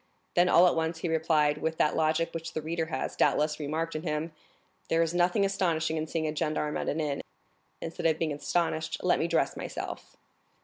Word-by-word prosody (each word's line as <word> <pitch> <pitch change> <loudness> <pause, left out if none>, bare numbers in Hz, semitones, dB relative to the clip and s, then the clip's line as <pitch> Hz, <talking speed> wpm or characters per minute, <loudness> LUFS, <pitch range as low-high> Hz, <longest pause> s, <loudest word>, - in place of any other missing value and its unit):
Then, 175 +1 +4
all 175 +1 +7
at 180 - +4
once, 160 0 -1
he 175 - -1
replied, 155 -2 +2
with 160 +1 -2
that 150 - +2
logic 160 +1 +1
which 165 0 -5
the 155 - -2
reader 165 +1 -2
has, 130 -4 -3
doubtless, 150 +1 +2
remarked 155 +3 -2
in 155 - -2
him, 155 0 -3 0.6
"There 165 0 +3
is 165 0 -2
nothing 180 +3 +3
astonishing 165 -5 0
in 155 0 -2
seeing 160 0 -2
a 155 0 -2
gendarme 150 -1 -1
at - - -2
an 155 - -1
inn; 145 -3 -1 0.6
instead 165 0 -2
of 160 -1 +2
being 160 -2 -1
astonished, 160 +1 -1
let - - +3
me - - +1
dress - - +1
myself." - - -6
160 Hz, 205 wpm, -29 LUFS, 155-165 Hz, 0.6 s, all